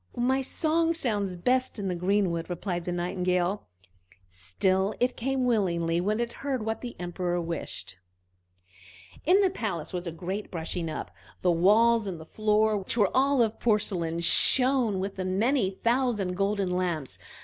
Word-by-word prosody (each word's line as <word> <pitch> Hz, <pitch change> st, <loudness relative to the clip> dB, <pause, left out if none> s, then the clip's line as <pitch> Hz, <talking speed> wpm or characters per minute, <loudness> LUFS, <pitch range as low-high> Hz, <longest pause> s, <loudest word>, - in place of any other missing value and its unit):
"My 260 Hz, +3 st, +2 dB
song 325 Hz, +4 st, +1 dB
sounds 205 Hz, -, -1 dB
best 255 Hz, +9 st, 0 dB
in 200 Hz, -2 st, -3 dB
the 185 Hz, -, -1 dB
greenwood!" 180 Hz, -2 st, 0 dB
replied 175 Hz, 0 st, -3 dB
the 180 Hz, -, -2 dB
Nightingale; 180 Hz, +2 st, -1 dB, 0.6 s
still 185 Hz, -, 0 dB
it 250 Hz, +1 st, +1 dB
came 265 Hz, +1 st, -1 dB
willingly 170 Hz, -7 st, +1 dB
when 210 Hz, +4 st, 0 dB
it 235 Hz, 0 st, -2 dB
heard 265 Hz, -6 st, -2 dB
what 220 Hz, 0 st, -2 dB
the 245 Hz, -1 st, -6 dB
Emperor 175 Hz, 0 st, -2 dB
wished. 165 Hz, -, -5 dB, 1.3 s
In 380 Hz, +4 st, +6 dB
the 385 Hz, -2 st, +3 dB
palace 195 Hz, -, -4 dB
there 180 Hz, -, -2 dB
was 175 Hz, -, -9 dB
a -, -, -3 dB
great 185 Hz, +5 st, -5 dB
brushing 165 Hz, 0 st, -4 dB
up. 155 Hz, -, -5 dB, 0.3 s
The 180 Hz, -, +4 dB
walls 215 Hz, +6 st, +4 dB
and 180 Hz, -4 st, -4 dB
the 160 Hz, -, -10 dB
floor, 215 Hz, +3 st, +2 dB
which 195 Hz, +4 st, -2 dB
were 205 Hz, -4 st, +2 dB
of 260 Hz, -4 st, +2 dB
porcelain, 180 Hz, -7 st, 0 dB
shone 250 Hz, +2 st, +3 dB
with 195 Hz, 0 st, -4 dB
many 195 Hz, +5 st, +1 dB
thousand 230 Hz, -2 st, 0 dB
golden 195 Hz, -1 st, 0 dB
lamps. 175 Hz, -6 st, -2 dB
195 Hz, 155 wpm, -27 LUFS, 175-235 Hz, 1.3 s, In